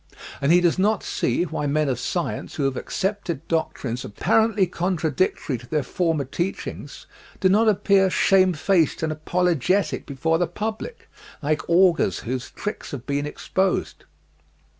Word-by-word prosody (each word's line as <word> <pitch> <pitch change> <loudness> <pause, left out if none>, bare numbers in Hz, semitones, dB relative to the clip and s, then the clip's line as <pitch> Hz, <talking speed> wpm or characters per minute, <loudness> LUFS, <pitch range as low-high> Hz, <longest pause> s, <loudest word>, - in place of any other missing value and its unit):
And 140 +2 +3
he 175 +1 +6
does 175 +1 +2
not 210 +3 +2
see - - 0
why 155 -4 -3
men 150 +1 +1
of 130 -3 -1
science 175 +6 -3
who 145 - -2
have 135 -1 0
accepted 190 -2 -3
doctrines 130 -7 -2
apparently 220 - +2
contradictory 170 -6 -1
to 125 - -14
their 150 0 0
former 165 +1 0
teachings 175 +8 -5 0.3
do 190 - +3
not 215 +4 +4
appear 195 -1 +3
shamefaced 185 -4 +3
and 160 - 0
apologetic 175 0 0
before 160 +4 0
the 175 - +1
public, 220 - -5 0.4
like 155 +3 -1
augurs 170 - +3
whose 125 +2 -4
tricks 210 - -6
had 130 -3 -7
been 145 +1 -1
exposed. 190 +5 -2
170 Hz, 140 wpm, -23 LUFS, 145-190 Hz, 0.4 s, he